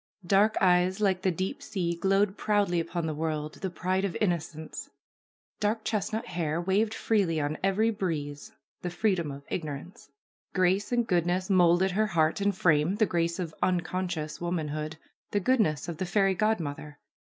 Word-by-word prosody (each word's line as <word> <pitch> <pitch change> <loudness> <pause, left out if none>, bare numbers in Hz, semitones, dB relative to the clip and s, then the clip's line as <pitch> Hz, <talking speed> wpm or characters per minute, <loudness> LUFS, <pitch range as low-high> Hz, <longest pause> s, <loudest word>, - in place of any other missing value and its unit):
Dark 200 +4 +4
eyes 180 +1 +3
like 190 -3 +2
the 190 - +2
deep 190 - -3
sea 175 -10 -2
glowed 195 +2 +2
proudly 205 -6 +1
upon 165 0 -2
the 160 - -1
world, 155 -1 -2
the 190 - -1
pride 185 +2 -1
of 195 -3 -1
innocence; 160 -5 -3 0.7
dark 215 +1 0
chestnut 220 +1 -2
hair 165 -2 -2
waved 200 +5 +1
freely 190 -8 +1
on 150 +1 -2
every 200 +4 +2
breeze, 150 -8 -4 0.3
the 180 - -3
free 205 +4 +1
dom 170 -5 -2
of 140 0 -8
ignorance. 155 0 -6 0.5
Grace 185 +3 +2
and 240 -1 +2
goodness 180 +1 +1
moulded 180 +1 +4
her 215 +4 +1
heart 165 -1 +1
and 200 -1 +1
frame, 160 +2 +3
the 215 +1 +3
grace 170 -2 0
of 170 -4 -4
unconscious 175 -3 -1
womanhood, 155 -3 -3 0.3
the 205 - +1
goodness 190 - +1
of 170 -3 -5
the 185 - -2
fairy 195 +1 +3
godmother. 160 -8 -2
180 Hz, 160 wpm, -28 LUFS, 160-200 Hz, 0.7 s, Dark